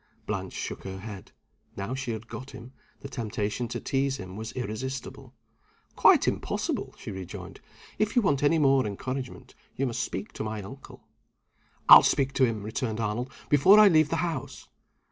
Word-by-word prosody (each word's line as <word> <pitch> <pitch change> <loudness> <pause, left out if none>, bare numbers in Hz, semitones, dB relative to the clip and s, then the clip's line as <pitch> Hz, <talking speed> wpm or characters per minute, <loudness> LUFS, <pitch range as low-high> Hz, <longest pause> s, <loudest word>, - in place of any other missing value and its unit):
Blanche - - -4
shook - - -5
her 95 0 -6
head. 100 -1 -9 0.5
Now 100 +5 -3
she 135 -1 -4
had 115 0 -5
got 130 +3 -8
him, 125 +1 -11 0.3
the - - -7
temptation 110 -2 -3
to 115 - -4
tease 135 0 -1
him 95 -1 -8
was 110 +1 -6
irresistible. 130 +2 -6 0.6
"Quite - - +5
impossible!" - - -2
she - - -7
rejoined. 95 -2 -8 0.4
"If 215 +3 0
you 245 - +4
want 140 -7 +2
any 145 +3 +3
more 135 -5 +3
encouragement, 130 +6 -6 0.2
you 135 - 0
must 120 -3 -2
speak 95 +3 -5
to - - -5
my 110 -1 -4
uncle." 135 +7 -12 0.8
"I'll - - +12
speak 135 -1 +1
to 135 - +4
him," 110 -4 -3
returned 110 +1 -3
Arnold, 115 +4 -2 0.2
"before 145 +8 +6
I 210 -1 +8
leave 155 -4 +4
the - - 0
house." 160 -7 -5
125 Hz, 170 wpm, -27 LUFS, 110-135 Hz, 0.8 s, I'll